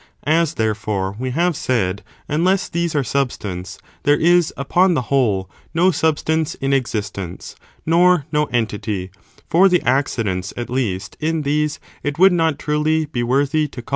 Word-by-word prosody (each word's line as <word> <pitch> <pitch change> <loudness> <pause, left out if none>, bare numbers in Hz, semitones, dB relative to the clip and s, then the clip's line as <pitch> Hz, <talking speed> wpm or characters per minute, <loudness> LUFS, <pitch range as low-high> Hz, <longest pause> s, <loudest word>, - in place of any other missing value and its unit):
As, 160 +2 +2
therefore, 105 -3 -1
we 130 +1 -2
have 170 +6 +1
said, 100 -8 -1 0.2
unless 180 +6 +1
these 170 -1 -2
are 145 - +2
substance, 100 -9 -3 0.2
there 145 0 +3
is, 175 0 +4
upon 175 +6 +2
the 130 - 0
whole, 105 -9 +2 0.3
no 180 +3 +4
substance 160 0 0
in 135 0 -1
existence, 100 -8 -3 0.3
nor 175 -1 +4
no 150 -1 +2
entity, 105 -6 -2 0.4
for 185 +4 +5
the 180 -1 +2
accidents, 115 -8 -1
at 120 0 -5
least, 100 -7 -2
in 160 0 -1
these 150 +1 0 0.2
it 145 0 -3
would 190 +2 +6
not, 165 -4 +1
truly, 155 +1 0
be 145 -5 -3
worthy 140 +5 +1
to 135 - -10
call - - -5
entities. - - -16
145 Hz, 160 wpm, -20 LUFS, 110-160 Hz, 0.4 s, would